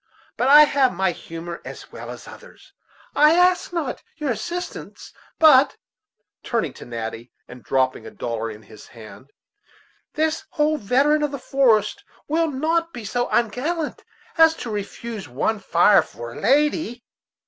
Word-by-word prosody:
But 250 - 0
I 295 +2 +9
have 275 -3 +2
my 190 0 +1
humor 170 0 -8
as - - -10
well - - -9
as - - -9
others. - - -15 0.4
I 300 +2 +6
ask 360 0 +3
not 330 -7 -3 0.2
your 300 -4 -2
assistance, 350 +9 -6 0.2
but" 290 -4 +6 0.6
turning 230 -2 -2
to - - -12
Natty, 115 0 -6 0.2
and 125 0 -12
dropping 130 -1 0
a - - -7
dollar 115 -1 -4
in 110 0 -10
his 110 - -15
hand 120 +2 -14 0.9
"this 315 +1 0
old 305 0 +2
veteran 275 +8 +2
of 295 - 0
the 280 - -5
forest 235 -6 +1 0.2
will 325 +2 +1
not 330 +4 -1
be 235 -3 -8
so 245 +4 -1
ungallant 260 +8 -1 0.4
as 320 0 +6
to 235 - -6
refuse 210 - -6
one 205 - -1
fire 195 +1 +4
for 120 0 -9
a - - -9
lady." 275 - +1
245 Hz, 150 wpm, -22 LUFS, -, 0.9 s, I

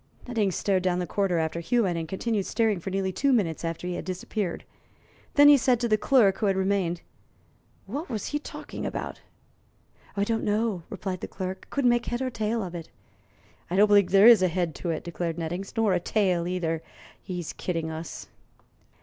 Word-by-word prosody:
Nettings 215 -6 0
stared 195 -2 +1
down 180 -1 +1
the 180 - -1
corridor 195 -2 0
after 160 +1 -1
Hewitt, 185 +1 +1
and 165 -1 -3
continued 200 +3 -2
staring 220 -5 +1
for 185 - -5
nearly 190 0 -1
two 275 +9 +1
minutes 185 -11 +1
after 165 +1 -4
he 180 - -2
had - - -4
disappeared. 185 0 -3 0.7
Then 290 0 +8
he 290 -1 +9
said 250 -1 +2
to 240 - 0
the 215 - +4
clerk, 210 -4 +3
who 215 - +1
had 195 - +2
remained: 190 -3 0 0.8
"What 285 - -5
was 215 -4 -3
he 295 - -1
talking - - -8
about?" - - -4 1.0
"Don't 225 +3 0
know," 210 -3 0
replied 190 -2 -4
the - - -4
clerk. 185 0 -6
"Couldn't 265 -4 +2
make 240 0 0
head 240 - -2
nor 260 -1 -1
tail 220 0 -1
of 180 -2 -6
it." 170 -2 -7 0.8
"I 175 - -2
don't 205 +2 +6
believe 205 -3 +5
there 195 +2 +6
is 230 -4 +9
a 185 - +4
head 175 -2 -1
to 175 - -4
it," 160 - -2
declared 170 -1 -3
Nettings; 175 +4 -4
"nor 220 -4 +3
a 180 - +2
tail 180 -3 +1
either. 165 -3 -1 0.4
He's 180 -3 -5
kidding 165 -3 -3
us." 160 +1 -7
190 Hz, 195 wpm, -27 LUFS, 175-220 Hz, 1.0 s, he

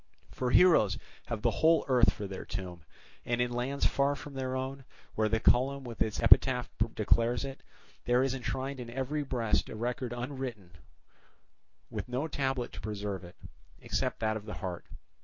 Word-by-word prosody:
For 125 - -2
heroes 125 - +5 0.3
have 115 -3 -4
the 120 - +3
whole 165 +1 +5
earth 125 -3 +5
for 105 - -6
their 95 -1 -6
tomb; 90 -2 -6 0.4
and 120 0 -1
in 125 0 +1
lands 130 +3 -1
far 140 +1 +2
from 145 0 -9
their 130 -1 -3
own, 135 +1 -4 0.3
where 110 0 +1
the 110 +1 +2
column 135 +4 +3
with 120 -4 -8
its 110 - 0
epitaph 125 -2 +5 0.3
declares 115 +4 +2
it, 135 -1 -7 0.4
there 125 +1 +3
is 135 -1 0
enshrined 135 +1 -3
in 120 -1 -6
every 135 +5 -2
breast 120 -6 0
a - - -6
record 120 +2 -2
unwritten 120 -6 -5 1.2
with - - -5
no 130 +5 -1
tablet 135 -4 -1
to - - -8
preserve 100 -3 -4
it, 90 0 -12 0.4
except - - -2
that 110 -1 +1
of 105 0 -10
the 105 - -5
heart. 90 -3 -5
125 Hz, 175 wpm, -31 LUFS, 110-135 Hz, 1.2 s, heroes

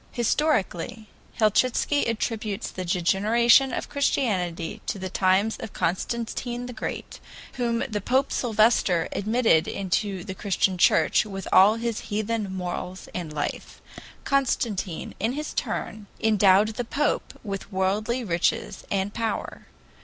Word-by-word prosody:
"Historically, 220 - 0 0.3
Helchitsky 255 +6 +2
attributes 220 -2 -2
the 185 - -5
degeneration 215 +9 +3
of - - -3
Christianity 185 - -1
to - - -2
the 190 -1 -5
times 190 +3 +2
of 215 - -8
Constantine 235 +6 -2
the 250 - -7
Great, 220 - -6 0.3
whom 235 -2 -1
he 215 -5 -2
Pope 260 +7 +1
Sylvester 215 -7 +2
admitted 215 -6 +2
into 195 0 -2
the 190 -1 -6
Christian 190 -1 0
Church - - +4
with 195 -2 -7
all 195 +4 +7
his 230 -1 -2
heathen 215 -1 -2
morals 180 0 -5
and 170 -4 -4
life. 150 -1 -4 0.4
Constantine, 230 - -1
in 225 +5 0
his 300 +2 -4
turn, 215 -1 -4
endowed 210 -1 +4
the 225 +3 -3
Pope 280 +5 -1
with 200 -1 -5
worldly 210 +6 0
riches 175 -5 -1
and 200 0 -1
power. 225 -1 -3
215 Hz, 125 wpm, -25 LUFS, 190-235 Hz, 0.4 s, all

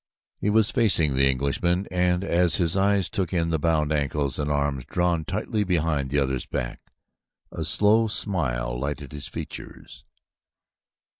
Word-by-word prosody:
He 105 - -1
was 110 0 +4
facing 100 - +4
the 70 +1 +3
Englishman, 80 +8 0
and 90 0 +1
as 90 -2 +2
his 85 -1 +1
eyes 100 -1 +2
took 95 -4 -3
in 85 -2 0
the 80 - 0
bound 80 -1 +1
ankles 70 -1 -1
and 75 0 -1
the - - +1
arms 70 -2 -1
drawn 85 -2 0
tightly 105 +2 -2
behind 80 -7 0
the 70 - -1
other's 65 -2 -1
back, - - -4 0.7
a - - -5
slow 110 +2 +3
smile 65 - -1
lighted 70 0 -5
his 75 -1 -7
features. - - -9
80 Hz, 155 wpm, -24 LUFS, 70-95 Hz, 0.7 s, was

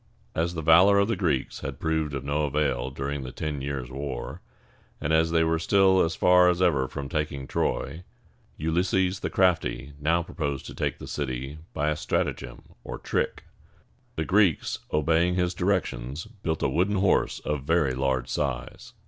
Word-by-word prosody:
As 85 +2 -1
the 80 - -3
valor 90 +6 +6
of 100 +2 +3
the 115 - +1
Greeks 80 -9 -1
had 70 +1 -6
proved 80 -3 -1
of 70 - -4
no 75 +2 0
avail 70 -3 0
during 70 +1 -4
the 65 -1 -6
ten 75 -1 -4
years' 70 -3 -4
war, 65 -2 -5 0.6
and 70 - -1
as 80 +1 +4
they 80 0 +3
were 80 0 +1
still 95 +2 +4
as 80 0 +1
far 90 0 +5
as 90 0 +1
ever 75 -8 +2
from 70 +1 -6
taking 70 -1 -3
Troy, 70 +4 -2 0.6
Ulysses 90 +4 +1
the - - -3
crafty 80 -6 +1
now 85 +4 +2
proposed 70 -5 -4
to - - -8
take - - -2
the - - -9
city 65 +1 -4 0.2
by 75 +2 +1
a - - 0
stratagem, - - -2 0.2
or - - -6
trick. - - -2 0.7
The 80 - -2
Greeks, 95 -4 +2
obeying 80 +3 +2
his 90 -1 +1
directions, 85 - -1
built 100 -8 -4
a - - +4
wooden 90 +9 +1
horse 95 0 +2
of 75 -2 -2
very 75 -2 +2
large 65 -1 0
size. - - -4
80 Hz, 175 wpm, -26 LUFS, 70-90 Hz, 0.7 s, valor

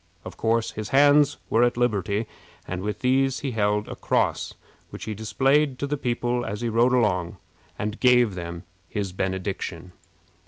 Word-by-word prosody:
Of - - -8
course, 115 0 0
his 110 -1 -6
hands 145 +1 +5
were 115 - +2
at 120 0 +2
liberty, 105 -3 0 0.4
and 90 0 -4
with 105 +2 -4
these 135 +1 +2
he 140 - -2
held 105 -2 0
a - - -6
cross, - - 0 0.3
which - - -9
he 110 - -4
displayed 135 +6 +1
to 140 - -2
the 145 +1 -1
people 120 -2 -1
as 105 -1 -5
he 120 - -1
rode 120 +3 +3
along, 90 -8 +1 0.4
and 105 +1 -4
gave 125 -4 +4
them 85 -1 -6 0.3
his 100 -3 -3
benediction. 95 -2 -4
115 Hz, 165 wpm, -25 LUFS, 100-125 Hz, 0.4 s, hands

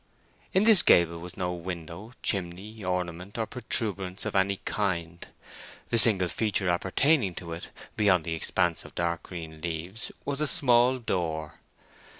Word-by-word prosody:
In 190 - +3
this 215 -4 +7
gable 85 -1 +5
was 90 +1 -9
no 90 -1 -1
window, 90 +4 -7
chimney, 100 +3 -3
ornament, 90 +1 -3
or 115 - 0
protuberance 100 -6 -2
of - - -3
any 100 +1 +3
kind. 85 -5 -2 0.6
The 115 - +3
single 100 -5 +4
feature 95 -1 0
appertaining 95 - +2
to 85 -2 -7
it, 85 - -7 0.3
beyond 95 -5 +4
the 85 0 -3
expanse 85 +1 0
of - - -14
dark 85 -1 -1
green 80 -3 -8
leaves, 85 +6 -4
was 140 +1 -2
a 150 - +2
small 125 -3 +4
door. 80 -9 -3
95 Hz, 150 wpm, -28 LUFS, 85-110 Hz, 0.6 s, this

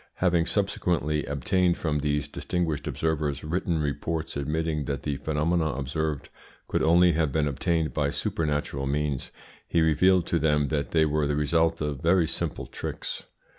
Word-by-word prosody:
Having 85 -2 +2
subsequently 85 -7 0
obtained 85 +6 +1
from 75 -3 -1
these 75 0 0
distinguished 80 -1 -2
observers 75 -3 -1
written 85 +1 -1
reports 80 +2 -2
admitting 75 +1 -1
that 70 +1 -3
the 70 -2 -2
phenomena 80 +3 0
observed 75 +2 -3 0.4
could - - 0
only 85 +2 +5
have 80 -3 +1
been 75 0 +1
obtained 80 +1 0
by - - +1
supernatural 75 -3 -2
means, 70 -1 -1 0.4
he 85 - +1
revealed 85 +3 +4
to 85 - 0
them 75 -2 +2
that 75 -2 -1
they 80 -1 +3
were 75 -1 +1
the 75 - 0
result 80 +2 +1
of 75 -3 -2
very 85 +1 +4
simple 85 -1 -3
tricks. - - -5
75 Hz, 155 wpm, -27 LUFS, 75-85 Hz, 0.4 s, only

